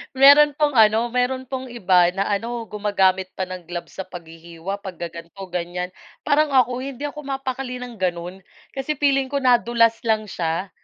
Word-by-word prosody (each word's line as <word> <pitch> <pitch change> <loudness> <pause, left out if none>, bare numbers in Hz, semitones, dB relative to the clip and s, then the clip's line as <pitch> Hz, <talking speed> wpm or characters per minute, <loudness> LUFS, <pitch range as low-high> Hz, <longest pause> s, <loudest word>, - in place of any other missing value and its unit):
Meron 285 +2 +7
pong 295 -2 +1
ano, 220 +2 +5
meron 250 +1 0
pong 260 -1 -4
iba 185 -6 +4
na 195 +1 -1
ano, 230 +3 -2
gumagamit 190 -3 +1
pa 190 - -2
ng 185 -1 -8
gloves 175 0 -7
sa 190 - -4
paghihiwa, 170 +1 -8
pag-gaganto, 170 -1 -8
ganyan. 180 +1 -3 0.4
Parang 300 +1 +3
ako, 250 -1 +3
hindi 275 0 -7
ako 300 +1 -8
mapakali 270 -2 -4
ng 245 -1 -7
ganon, 180 0 -3 0.4
kasi 270 +3 -2
feeling 275 -1 +2
ko 280 - 0
nadulas 235 -2 +3
lang 215 -1 +2
siya, 170 +2 -2
220 Hz, 160 wpm, -22 LUFS, 180-260 Hz, 0.4 s, Meron